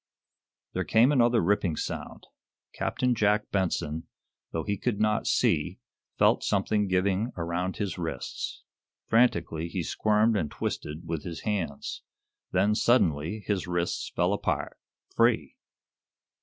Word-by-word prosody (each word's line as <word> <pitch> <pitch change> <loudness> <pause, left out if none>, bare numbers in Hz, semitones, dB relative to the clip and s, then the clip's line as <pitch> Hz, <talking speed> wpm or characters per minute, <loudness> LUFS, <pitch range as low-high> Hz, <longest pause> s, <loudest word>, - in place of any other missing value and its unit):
There 95 - -1
came 115 +7 +4
another 120 -4 +4
ripping 90 -2 +1
sound. - - -5 0.5
Captain 125 -1 0
Jack 105 -1 +1
Benson, 85 -4 -1 0.4
though 80 - -2
he 100 - -1
could 105 +1 -2
not 105 0 +1
see, - - +2 0.4
felt - - +4
something 105 +1 +1
giving 95 +5 +1
around 90 +2 -2
his 95 -3 -3
wrists. 80 -6 -4 0.4
Frantically 85 -8 +2
he 90 0 -3
squirmed 110 +5 +2
and 80 -8 0
twisted 75 +4 -4
with 80 -3 -3
his 85 -2 -6
hands. 90 -10 -3 0.5
Then, 100 +3 +3
suddenly, 105 - +2
his 100 -4 -1
wrists 90 -1 -1
fell - - +2
apart - - -2 0.4
free! - - +2
95 Hz, 125 wpm, -28 LUFS, 85-105 Hz, 0.5 s, came